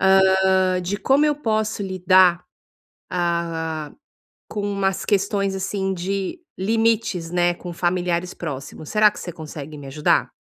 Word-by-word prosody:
hã, 190 -1 +4
de 195 +3 -2
como 275 +7 +3
eu 300 - +3
posso 215 -5 -1
lidar, 185 -2 +4 0.7
ah, 165 -3 -2 0.6
com 210 - -4
umas 195 -1 0
questões, 200 -1 +1
assim, 190 0 -2
de 190 - -3 0.2
limites, 220 -4 +1
né, 175 0 +2
com 175 0 -8
familiares 175 0 -1
próximos. 145 -1 -7
Será 210 -1 +5
que - - -10
você 175 - -6
consegue 155 -2 -8
me 140 - -9
ajudar? 145 +3 +1
185 Hz, 130 wpm, -22 LUFS, 170-200 Hz, 0.7 s, Será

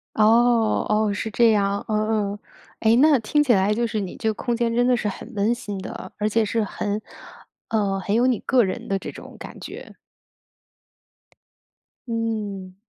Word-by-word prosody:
哦 225 +1 +4
哦， 215 0 +2
是 215 +2 -3
这 230 +2 +4
样， 200 -1 +1
嗯 215 -1 0
嗯。 - - -10 0.4
哎， 225 +1 +4
那 290 +2 +5
听 295 +7 +2
起 275 -4 +3
来 195 +1 +2
就 235 +2 0
是 220 -1 -2
你 190 -3 -5
这 220 - -2
个 220 - 0
空 240 +2 -2
间 230 -1 0
真 245 +1 +3
的 250 0 +4
是 215 - -2
很 210 +4 -8
温 210 +3 +1
馨 205 -4 -6
的， 230 +4 -8
而 210 0 +1
且 225 +1 +2
是 225 +2 0
很 205 +1 -3 0.7
呃， 200 -3 0
很 200 +2 -2
有 240 +3 +3
你 250 -4 +2
个 255 -2 +3
人 190 - -4
的 195 - 0
这 - - -7
种 - - -12
感 - - -10
觉。 - - -9 2.1
嗯。 215 -5 -3
220 Hz, 195 characters per minute, -23 LUFS, 205-235 Hz, 2.1 s, 那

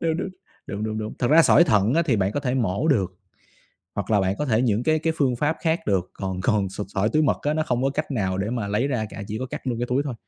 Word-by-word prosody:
Đúng, 165 -1 0
đúng, 190 - -3 0.4
đúng, 100 +2 -4
đúng, 110 0 -3
đúng. 110 0 -5
Thật 120 - +1
ra 160 +2 +7
sỏi 170 - +6
thận 105 - +2
á 165 - +4
thì 135 -9 +1
bạn 100 0 0
có - - -1
thể 130 -3 -1
mổ 115 - 0
được, 95 - +1 0.8
hoặc 100 +1 -3
là 105 - +4
bạn 95 +1 0
có 150 - 0
thể 115 -4 +2
những 115 -2 +1
cái 155 +1 +2
cái 160 +1 0
phương 130 -4 +2
pháp 150 +5 0
khác 165 0 +1
được, 95 -3 +1
còn 95 -1 -4
còn 100 -2 +1
sụt 95 +1 -6
sỏi 100 +1 0
túi 155 +6 +2
mật - - +2
á 150 +1 0
nó 155 0 0
không 125 -3 -1
có 135 - +2
cách 150 +2 -3
nào 95 -7 -1
để 100 +3 -2
mà 115 -4 -2
lấy 105 +7 0
ra 125 -6 -1
cả, 100 - -7
chỉ 105 +1 -4
có 130 - -3
cắt 130 - -7
luôn 120 -2 -1
cái 120 - -2
túi 135 +3 +1
thôi. 135 -4 -4
120 Hz, 305 wpm, -24 LUFS, 100-145 Hz, 0.8 s, ra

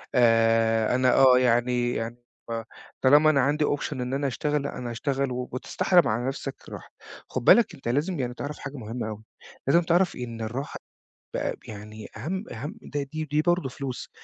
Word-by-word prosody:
آآ 115 -1 +4
أنا 130 0 +3
آه 130 -2 +7
يعني 120 0 +2
يعني 115 +1 -4 0.3
ب 115 -1 -3 0.4
طالما 145 +4 +6
أنا 140 -3 +4
عندي 145 +3 +2
option 145 - -1
إن 125 -1 -4
أنا 140 +1 0
أشتغل، 150 +3 -1
لأ 145 - -5
أنا 120 - -5
هأشتغل، 135 +2 -1
وبتستحرم 130 +6 +1
على 120 +4 -1
نفسك 135 - -4
الراحة. - - -10 0.4
خُد 130 - -3
بالك، 235 -2 +6
أنت 135 - -10
لازم 150 +7 0
يعني 125 -2 -2
تعرف 145 +4 -6
حاجة 140 0 -7
مهمة 115 -1 -5
أوي. 110 0 -8 0.4
لازم 170 +6 +5
تعرف 175 +2 +2
إن 115 -2 -6
الراحة 120 +6 -4 0.6
ب - - -1
يعني 105 0 -9
أهَمْ 185 - -3
أهَمْ، 145 - -6
دي 145 -1 -4 0.3
دي 150 - +3
برضه 175 -3 +1
فلوس. 130 -1 -6
130 Hz, 175 wpm, -26 LUFS, 115-145 Hz, 0.6 s, آه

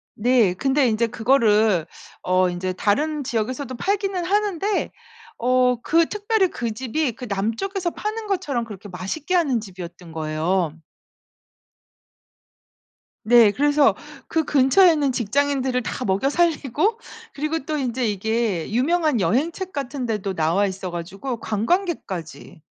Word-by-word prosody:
네. 230 -4 +3
근데 270 +7 +2
인제 230 +1 +1
그거를 220 - +3 0.4
어 185 0 +2
인제 180 +1 -3
다른 290 +11 0
지역에서도 255 +2 -3
팔기는 390 - -1
하는데 405 0 0 0.5
어 250 0 +2
그 330 0 +3
특별히 420 -2 +1
그 235 -7 -3
집이 260 +5 -1
그 250 +3 -8
남쪽에서 230 - -2
파는 430 +4 -4
것처럼 300 - -1
그렇게 205 -2 -10
맛있게 195 - -3
하는 285 -9 +2
집이었던 180 -3 -10
거예요. 160 +2 -1 2.5
네. 230 -1 +6
그래서 290 +4 +3 0.3
그 320 -1 0
근처에 295 +7 +5
있는 290 -3 +1
직장인들을 260 +2 0
다 250 - -4
먹여 195 +8 +1
살리고, 330 - +1 0.4
그리고 305 +3 -2
또 310 0 -2
인제 255 -3 -1
이게 210 -3 -1
유명한 300 +3 +2
여행책 315 - -1
같은 275 -2 -4
데도 210 -4 -2
나와 170 +4 +1
있어 190 -1 -4
가지고 195 +9 -5
관광객까지. 215 - -3
250 Hz, 285 characters per minute, -22 LUFS, 200-310 Hz, 2.5 s, 네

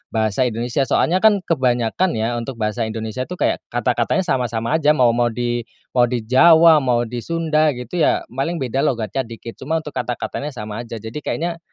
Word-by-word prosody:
bahasa 110 +3 +1
Indonesia. 120 +3 -1
Soalnya, 180 +3 +2
kan, 205 -2 +4
kebanyakan, 130 +3 0
ya, 115 +2 -1
untuk 120 +2 -6
bahasa 110 0 -2
Indonesia, 110 +3 -4
tuh, 180 - -6
kayak - - 0
kata-katanya 190 - 0
sama-sama 120 -3 -1
aja. 150 0 +3
Mau 125 -4 +4
mau 120 +1 +1
di 120 0 -2 0.2
mau 125 -1 +3
di 120 -2 -2
Jawa, 160 +6 +6
mau 125 -4 +1
di 120 +1 -5
Sunda, 155 +1 +1
gitu, 125 +8 -5
ya, - - +2
paling 135 +7 -2
beda 130 0 -2
logatnya 120 -1 -1
dikit. 115 0 -10
Cuma 160 +4 -1
untuk 150 - -7
kata-katanya 125 +3 -4
sama 105 -2 -6
aja. 115 - -7
Jadi 115 +6 -6
kayaknya 170 +2 -3
125 Hz, 185 wpm, -20 LUFS, 115-155 Hz, 0.2 s, Jawa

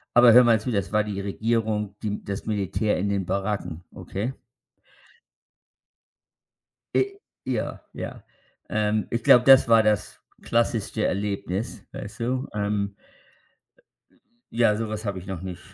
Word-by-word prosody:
Aber 120 -1 +8
hör 125 +2 +9
mal 115 -2 +4
zu, 120 - -3
das 100 -3 -1
war 105 0 +3
die 100 -2 -4
Regierung, 105 0 -1
die 105 -1 -3
das 100 -1 -5
Militär 105 0 0
in 100 +3 -1
den 100 -1 0
Baracken, 95 -4 -3
okay? 110 +7 -4 2.6
Äh, 395 0 +1 0.3
ja, 125 -4 -3
ja. - - -7 0.5
Ähm, 105 0 0
ich 115 -1 -1
glaube, 125 0 +7
das 135 -2 +7
war 115 -1 +6
das 105 -2 0 0.2
klassischste 115 -2 0
Erlebnis, 100 +1 -2
weißt 100 - -8
du? 130 +3 -1
Ähm. 100 -1 -1 1.6
Ja, 115 -2 +3
so 110 0 -3
was 110 +1 -5
habe 100 -3 -2
ich 90 - -10
noch 95 -4 -5
nicht 90 -2 -6
105 Hz, 135 wpm, -25 LUFS, 100-115 Hz, 2.6 s, hör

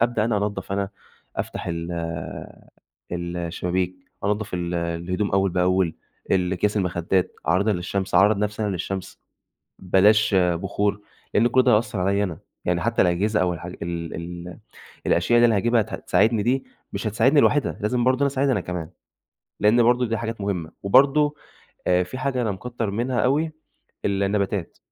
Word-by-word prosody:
أبدأ 120 -2 +2
أنا 115 -2 +1
أنضف 100 -1 -2
أنا، 100 0 -1 0.5
أفتح - - -4
ال 85 0 -3 1.2
الشبابيك، 90 +1 -2 0.3
أنضف 105 -1 -1
ال 90 0 -2
الهدوم 85 +4 -2
أول 95 0 +2
بأول، 90 -1 +1 0.4
ال 90 -1 +2
أكياس 105 +3 0
المخدات، 90 -1 0 0.2
أعرضها 100 +5 +3
للشمس، 95 +1 -3
أعرض 100 +4 +5
نفسي 105 +1 -2
أنا 105 - 0
للشمس، 95 +1 -5 0.6
بلاش 105 +3 +4
بخور، 95 +3 0 0.3
لإن 115 +3 +4
كل 130 +2 +4
ده 125 - +4
هيأثر 105 -2 0
عليّا 100 +2 +2
أنا. 85 -5 -5 0.3
يعني 85 -1 +1
حتى 115 +3 +2
الأجهزة 90 +3 +1
أو 90 -1 +1
الحا 85 +2 -8
ال 85 -2 -5
ال 85 +1 -7 0.5
الأشياء 120 - +3
اللي 120 - +6
أنا 110 -3 +3
هاجيبها 115 +3 +3
هت 105 - -4
هتساعدني 110 -2 +2
دي، 130 +4 +1 0.3
مش 100 +2 -4
هتساعدني 130 +7 +4
لوحدها، 145 -5 +2
لازم 120 +3 0
برضو 130 0 +3
أنا 140 - +3
أساعدها 135 0 +1
أنا - - +1
كمان، 90 -3 -5 0.7
لإن 110 +4 +5
برضو 125 +1 +3
دي 115 -1 -1
حاجات 115 -1 -4
مهمة. 90 -5 -2
وبرضو، 145 +8 +4 0.5
آآ، 90 0 +4
فيه 90 +9 -6
حاجة 130 -2 -1
أنا 110 - 0
مكتر 115 +2 -4
منها 120 +4 -1
أوي، 155 +5 +1 0.5
النباتات، 100 -2 -1
100 Hz, 160 wpm, -23 LUFS, 90-115 Hz, 1.2 s, اللي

